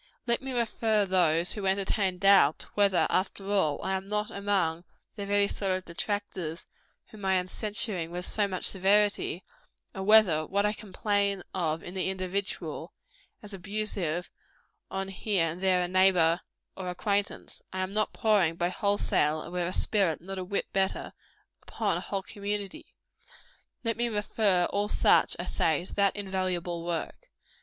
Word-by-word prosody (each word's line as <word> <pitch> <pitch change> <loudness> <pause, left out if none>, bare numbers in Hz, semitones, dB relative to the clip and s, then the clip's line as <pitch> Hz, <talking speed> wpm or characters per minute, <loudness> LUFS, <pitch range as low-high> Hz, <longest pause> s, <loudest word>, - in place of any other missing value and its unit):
Let 235 0 +1
me 265 0 -5
refer 225 -3 +1
those 175 -2 +3
who 200 -3 -3
entertain 195 -1 +1
doubts 195 -6 +5
whether, 200 -3 +3
after 195 +1 -1
all, 160 -8 +1
I 190 - 0
am 190 +1 -5
not 210 0 -1
among 190 -5 0 0.3
the 200 -2 -5
very 200 0 +3
sort 195 -1 -2
of 185 0 -3
detractors 180 -2 -3 0.5
whom 215 -2 -12
I 190 0 +2
am 180 0 0
censuring 205 -3 -1
with 180 +1 -2
so 210 -2 +1
much 185 -2 -1
severity 200 -1 +2 0.5
and 190 -1 -5
whether, 210 -8 +6
what 200 +1 +1
I 210 - +1
complain 200 -2 -1
of 165 -3 -1
in 175 - -8
the 190 0 -1
individual, 190 +1 -4 0.5
as 205 -1 -6
abusive 190 -3 -3 0.6
on 195 0 -3
here 195 -2 0
and 165 +3 -4
there 185 -1 +3
a - - -1
neighbor 180 -2 +4 0.3
or 185 -2 -5
acquaintance, 200 +3 -2
I 185 - -2
am 185 +1 -3
not 215 0 +1
pouring, 200 -7 +2
by 175 +1 0
wholesale, 180 -6 +1
and 175 - -9
with 175 -1 -1
a - - -2
spirit 190 -5 +1
not 190 +3 -6
a - - -3
whit 200 +2 -2
better, 190 0 -1 0.5
upon - - -1
a - - -4
whole 195 -1 -3
community, 205 -1 -5 0.9
let 230 -1 -1
me 240 0 0
refer 210 -4 +2
all 205 +1 0
such, - - +4
I - - -4
say, 160 +1 +1
to - - -8
that 200 -1 +2
invaluable 185 -4 -2
work. 175 - -4
190 Hz, 165 wpm, -28 LUFS, 180-205 Hz, 0.9 s, whether